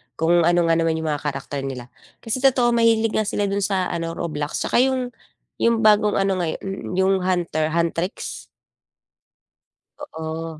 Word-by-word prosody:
kung 170 Hz, +1 st, +3 dB
ano 175 Hz, 0 st, +3 dB
nga 165 Hz, -, +3 dB
naman 165 Hz, -1 st, +1 dB
'yong 160 Hz, 0 st, -3 dB
mga 145 Hz, -, -2 dB
character 140 Hz, 0 st, -4 dB
nila, 130 Hz, -3 st, -6 dB, 0.3 s
kasi 225 Hz, +3 st, -2 dB
totoo 255 Hz, -2 st, +3 dB
mahilig 225 Hz, -1 st, +3 dB
nga 215 Hz, -, 0 dB
sila 205 Hz, -, -1 dB
do'n 200 Hz, -, 0 dB
sa 190 Hz, -2 st, 0 dB
ano 165 Hz, -1 st, -3 dB
Roblox, 150 Hz, -3 st, -4 dB
'saka -, -, +1 dB
'yong 255 Hz, -1 st, +1 dB, 0.5 s
'yong 230 Hz, -1 st, +2 dB
bagong 210 Hz, -1 st, +4 dB
ano 195 Hz, -1 st, +1 dB
ngayon 170 Hz, -3 st, -2 dB, 0.4 s
'yo 190 Hz, -, +2 dB
'yong -, -, +3 dB
Hunter 170 Hz, -4 st, 0 dB
Huntrix. 170 Hz, +2 st, -2 dB, 1.5 s
Oo, 160 Hz, -, -6 dB
175 Hz, 160 wpm, -22 LUFS, 160-220 Hz, 1.5 s, bagong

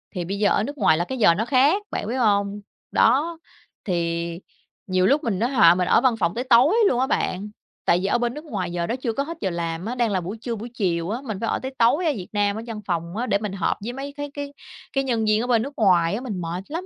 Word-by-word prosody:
thì 175 Hz, -, -2 dB
bây 200 Hz, +3 st, -4 dB
giờ 210 Hz, -, +3 dB
ở 205 Hz, -, +2 dB
nước 285 Hz, +5 st, -5 dB
ngoài 155 Hz, -, +4 dB
là 175 Hz, -, 0 dB
cái 260 Hz, -, -5 dB
giờ 205 Hz, -8 st, +5 dB
nó 215 Hz, +5 st, -1 dB
khác, 285 Hz, +10 st, +3 dB
bạn -, -, -3 dB
biết 240 Hz, -, -2 dB
hông? 205 Hz, -3 st, +1 dB, 0.3 s
Đó, 305 Hz, +8 st, +2 dB, 0.5 s
thì 170 Hz, -2 st, -2 dB, 0.5 s
nhiều 185 Hz, 0 st, +2 dB
lúc 285 Hz, +3 st, +2 dB
mình 210 Hz, -6 st, -1 dB
nói 235 Hz, +3 st, +1 dB
họ 175 Hz, -10 st, +6 dB
mình 180 Hz, 0 st, 0 dB
ở -, -, +4 dB
văn 255 Hz, -3 st, +3 dB
phòng 170 Hz, -3 st, +1 dB
tới 245 Hz, -, -2 dB
tối 260 Hz, -, +5 dB
luôn 245 Hz, -, 0 dB
á 260 Hz, -, +2 dB
bạn, 205 Hz, -6 st, -1 dB, 0.4 s
tại 175 Hz, -, +3 dB
vì -, -, +1 dB
ở 205 Hz, -, +2 dB
bên 240 Hz, 0 st, -1 dB
nước 300 Hz, +2 st, -9 dB
ngoài 190 Hz, -, -3 dB
giờ 170 Hz, -1 st, -2 dB
đó 235 Hz, -, -1 dB
chưa 250 Hz, -3 st, -3 dB
có 275 Hz, -, -1 dB
hết 330 Hz, +2 st, -7 dB
giờ 190 Hz, -, 0 dB
làm 170 Hz, 0 st, -3 dB
á, 240 Hz, +3 st, -3 dB
đang 240 Hz, -3 st, +1 dB
là 185 Hz, -2 st, 0 dB
buổi 195 Hz, +6 st, -6 dB
trưa, 235 Hz, -2 st, -3 dB
buổi 225 Hz, +3 st, -7 dB
chiều 175 Hz, -6 st, -1 dB
á, 235 Hz, +5 st, -3 dB
mình 220 Hz, -7 st, -4 dB
phải 230 Hz, -, -2 dB
ở -, -, 0 dB
tới 265 Hz, 0 st, -6 dB
tối 260 Hz, +10 st, +3 dB
ở 315 Hz, -, +3 dB
Việt 180 Hz, -, -8 dB
Nam 205 Hz, 0 st, +1 dB
ở -, -, -4 dB
văn 220 Hz, -2 st, -6 dB
phòng 170 Hz, +1 st, -3 dB
á 240 Hz, -, -1 dB
để 200 Hz, -, +2 dB
mình 210 Hz, -2 st, -5 dB
họp 185 Hz, -4 st, -1 dB
với 240 Hz, -, -4 dB
mấy 275 Hz, +2 st, -6 dB
cái 290 Hz, -1 st, -5 dB
cái 285 Hz, -1 st, -6 dB, 0.4 s
cái 270 Hz, -, +1 dB
nhân 235 Hz, -4 st, 0 dB
viên 215 Hz, 0 st, +3 dB
ở 245 Hz, -, -3 dB
bên 235 Hz, -3 st, +3 dB
nước 280 Hz, +3 st, -6 dB
ngoài 180 Hz, -4 st, +3 dB
á, 240 Hz, -, -4 dB
mình 210 Hz, -8 st, -4 dB
mệt 170 Hz, +2 st, -4 dB
lắm. 335 Hz, +5 st, -5 dB
220 Hz, 290 wpm, -23 LUFS, 185-255 Hz, 0.5 s, họ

